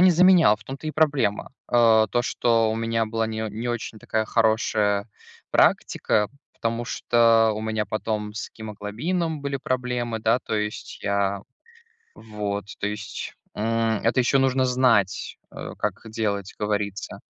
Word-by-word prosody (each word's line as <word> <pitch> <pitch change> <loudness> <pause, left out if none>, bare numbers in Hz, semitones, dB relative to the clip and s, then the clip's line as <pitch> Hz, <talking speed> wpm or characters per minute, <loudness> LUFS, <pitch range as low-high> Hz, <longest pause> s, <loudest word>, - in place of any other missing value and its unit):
не 185 0 +7
заменял, 175 - +6
в 105 - -19
том-то 135 +4 -6
и - - -1
проблема. 140 -10 +1 0.2
А, 115 -3 +5
то, 120 - +1
что 115 -2 +2
у - - -2
меня 115 0 0
была 115 0 -1
не 110 - -4
о 110 - -2
не 115 +4 -5
очень 115 -2 -4
такая 110 0 -1
хорошая 110 -2 +1 0.4
практика, 105 -1 +2 0.2
потому 115 +1 -2
что, 115 -1 +3
у 105 - -4
меня 110 -1 -2
потом 105 0 -3
с 110 - -5
гемоглобином 125 - -3
были 140 -1 -2
проблемы 125 -3 -2
да, 115 +3 +2
то - - -4
есть 105 0 -4
я 100 -1 0 0.7
Вот, 105 -2 -4
то 100 - 0
есть, 105 +1 -6 0.2
м, 115 0 0
это 115 +3 +1
еще 125 +3 +2
нужно 130 -1 +2
знать, 125 -6 +2
э, - - -7
как - - -2
делать, 100 -3 -2
говорится. 105 -1 -3
110 Hz, 150 wpm, -24 LUFS, 105-120 Hz, 0.7 s, не